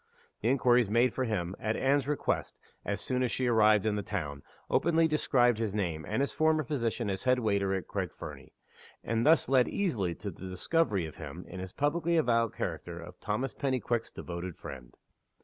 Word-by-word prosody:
The 115 - +1
inquiries 125 -4 +4
made 120 +4 +3
for 130 - -1
him, 95 -5 -2
at 110 +1 -1
Anne's 135 0 +2
request, 150 -1 -1 0.3
as 100 - -2
soon 130 -1 -1
as 125 -2 +1
she 130 - -1
arrived 110 -3 +4
in 105 -1 +1
the - - -1
town, 75 -9 -4 0.3
openly 165 -1 +3
described 125 -6 +3
his 110 -3 -1
name, 85 -7 -2
and 110 +6 0
his 140 - -1
former 155 0 +2
position 120 -5 -1
as 95 +3 -3
headwaiter 110 -6 +2
at 95 - -4
Craig - - -3
Fernie - - -10 0.5
and 115 +1 0
thu 150 - +5
s 165 - +1
led 130 -2 +4
easily 110 - -1
to 100 - -6
the 95 +2 -9
discovery 100 - +1
of 80 - -9
him, - - -8
in 95 - -8
his 95 0 -6
publicly 165 - +1
avowed 115 -6 +2
character 85 -1 -4
of 90 +2 -11
Thomas 125 +6 -2
Pennyquick's 125 -4 -1
devoted 85 0 -6
friend. 65 -6 -10
115 Hz, 190 wpm, -30 LUFS, 95-130 Hz, 0.5 s, thu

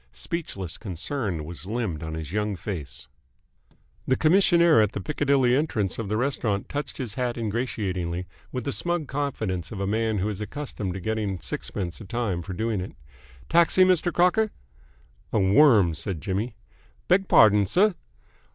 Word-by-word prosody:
Speechless 100 - -5
concern 95 - -3
was 85 +3 -9
limned 105 -8 -2
on 80 -1 -5
his 80 -1 -6
young 105 0 -1
face. 90 -6 -6 1.0
The 130 - +2
commissionaire 170 - +5
at 105 -2 +1
the - - -3
Piccadilly 135 +1 +2
entrance 115 - -1
of 110 -4 -3
the 110 - 0
restaurant 115 -6 -1
touched 145 0 -4
his 120 -6 -4
hat 125 -1 -2
ingratiatingly, 100 -6 -2 0.3
with 125 -2 -3
the 140 - -2
smug 170 0 -1
confidence 110 - -3
of 105 - -6
a 100 - -1
man 110 +1 0
who 95 +2 0
is 105 -1 -4
accustomed 105 -6 -4
to - - -4
getting 105 -1 -2
sixpence 85 +3 -4
a - - -8
time 100 -4 -2
for 95 +2 -6
doing 110 0 -1
it. 90 - -7 0.5
"Taxi, 170 +2 +5
Mr. 180 -1 +3
Crocker?" 180 +6 +3 0.8
"A - - +1
worm," 100 - +5
said 90 +1 -4
Jimmy. 105 +7 -3 0.5
"Beg 190 +2 +3
pardon, 105 -2 +6
sir?" 195 - +3
110 Hz, 160 wpm, -25 LUFS, 95-140 Hz, 1.0 s, pardon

